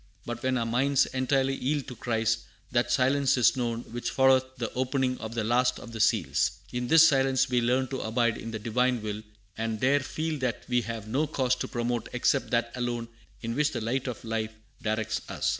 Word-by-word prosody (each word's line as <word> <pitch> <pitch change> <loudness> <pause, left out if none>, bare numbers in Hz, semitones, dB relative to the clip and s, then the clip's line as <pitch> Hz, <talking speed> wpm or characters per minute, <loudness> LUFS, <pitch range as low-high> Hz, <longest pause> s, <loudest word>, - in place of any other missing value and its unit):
But 120 0 -5
when 130 0 +1
our 115 - 0
minds 130 +4 +2
entirely 130 +1 +1
yield 140 +2 -1
to 125 - -7
Christ, 115 -1 0 0.3
that 120 0 +1
silence 135 +2 +3
is 125 - +4
known 120 -2 -2
which 120 +1 -3
followeth 130 -1 +3
the 115 -2 -4
opening 130 0 0
of 110 +1 -6
the 115 - 0
last 125 +3 +2
of 115 - -10
the 115 - -7
seals. - - +2 0.2
In 125 0 -2
this 160 +3 +8
silence 135 -2 +2
we 125 -1 +2
learn 125 +2 +1
to 130 - -3
abide 115 0 0
in 115 - -6
the 115 - -4
Divine 120 +2 0
will, 105 0 -4 0.4
and 110 -1 -2
there 135 +4 +3
feel 155 +2 -3
that 125 -3 -2
we 125 -1 +2
have 115 -2 -6
no 140 +8 0
cause 130 -4 +1
to - - -3
promote 120 -1 -2
except 125 +2 +1
that 120 0 0
alone 120 -2 -3 0.3
in 115 0 -2
which 150 +2 +1
the - - -3
light 130 +4 -1
of 120 -2 -5
life 110 -1 -2 0.3
directs 110 0 -1
us." - - -1
125 Hz, 210 wpm, -28 LUFS, 115-130 Hz, 0.4 s, this